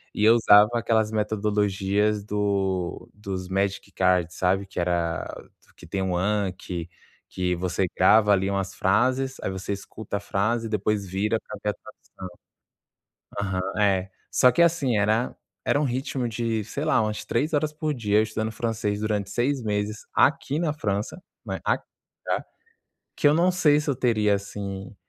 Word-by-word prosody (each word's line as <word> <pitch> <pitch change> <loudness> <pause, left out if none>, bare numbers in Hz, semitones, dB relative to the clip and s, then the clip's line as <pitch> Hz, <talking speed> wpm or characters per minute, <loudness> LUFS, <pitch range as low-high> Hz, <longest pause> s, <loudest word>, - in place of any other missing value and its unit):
E 105 - 0
eu 110 +2 +7
usava 105 -2 +7
aquelas 110 -1 +1
metodologias 105 -1 0
do 100 -3 -1
dos 95 -3 -5
magic 100 +1 -1
cards, 90 -2 +1
sabe? 95 +2 +1
Que 95 - -6
era 85 -1 -1 0.5
que - - -13
tem 95 - -3
um 95 -1 -1
anque, 95 -3 -2 0.4
que 90 -1 -2
que - - 0
você 90 +2 -1
grava 105 +3 +5
ali 95 -1 +3
umas 100 -1 -2
frases, 130 +7 +1
aí - - -1
você 95 +1 -4
escuta 100 +1 -6
a - - -4
frase, 110 +3 -1
depois 105 -1 0
vira 100 +5 0
pra - - -9
ver 105 - +1
a - - -9 1.7
tradução. 95 -2 -1
Aham. 105 - -2
É. 95 -2 +2 0.2
Só 125 - +5
que, 125 - -1
assim, 160 -8 +2
era 110 +4 +1 0.3
era 145 - +2
um - - +1
ritmo 130 -1 -2
de, 115 -1 -2
sei 140 +8 -4
lá, 155 -6 +3
umas 105 -1 -3
3h 150 +4 0
por 155 0 -2
dia 105 -4 +1
eu - - +5
estudando 110 0 -3
francês 110 -2 -2
durante 105 -2 -1
6 125 +5 0
meses 105 0 -2
aqui 140 +1 +2
na 165 -2 0
França, 105 -8 -2 0.3
né, - - -4
aqui, - - 0 0.4
tá? - - -1 0.7
Que - - +2
eu - - +5
não 175 +3 +4
sei 150 -5 +4
se 150 - -6
eu 140 - +2
teria, 110 -5 +2
assim, 100 0 -6
105 Hz, 165 wpm, -25 LUFS, 95-115 Hz, 1.7 s, eu